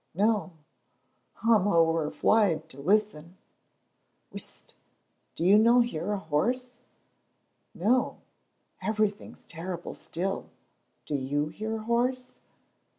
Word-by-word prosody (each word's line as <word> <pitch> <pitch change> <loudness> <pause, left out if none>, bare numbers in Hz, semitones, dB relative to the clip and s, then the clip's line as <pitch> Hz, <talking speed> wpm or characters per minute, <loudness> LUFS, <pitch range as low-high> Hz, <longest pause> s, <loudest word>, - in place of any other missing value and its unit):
"No; 205 -1 +1 0.9
I'm 220 -4 +4
ower 165 -4 +3
fleid 170 -6 +2
to 140 -2 -11
listen." 185 -1 0 1.0
"Whisht! - - -8 0.6
do 165 - -2
you 200 +3 +7
no 235 +3 +6
hear 210 -5 -2
a 205 - 0
horse?" 240 +10 -1 1.0
"No, 240 +8 +1 0.6
everything's 210 +1 -2
terrible 175 +1 -6
still. 190 +3 -4 0.6
Do - - -5
you 145 +2 -1
hear 220 +7 -4
a 220 - -5
horse?" 250 +2 0
200 Hz, 100 wpm, -28 LUFS, 165-225 Hz, 1.0 s, you